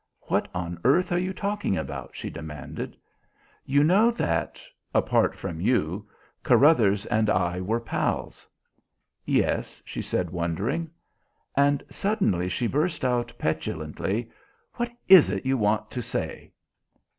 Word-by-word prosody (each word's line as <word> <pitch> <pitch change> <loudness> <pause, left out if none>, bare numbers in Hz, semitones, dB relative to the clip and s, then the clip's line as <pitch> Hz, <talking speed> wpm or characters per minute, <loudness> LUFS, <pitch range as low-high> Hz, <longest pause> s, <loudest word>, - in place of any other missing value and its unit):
"What - - 0
on 85 -1 -4
earth 175 +9 +3
are 175 - +2
you 185 +1 -1
talking 200 - -1
about?" - - -6
she - - -5
demanded. 75 -1 -7 0.7
"You 140 +2 +4
know 195 +9 +5
that 85 - -1 0.4
apart - - +2
from 80 -1 -5
you 100 -1 0 0.3
Carruthers 110 -10 +4
and 110 0 +1
I 90 -1 +1
were 110 +5 0
pals?" 115 - -3 0.8
"Yes," - - 0
she - - -5
said 90 -2 -2
wondering. 95 - -2 0.7
And 140 0 +3
suddenly 190 - 0
she 105 +7 -1
burst 155 +4 0
out 120 -2 0
petulantly. 80 +8 -2 0.4
"What 240 0 -2 0.2
is 185 - +9
it 95 +3 -3
you 135 0 +2
want 110 -2 0
to 125 - -3
say?" - - -4
115 Hz, 130 wpm, -26 LUFS, -, 0.8 s, is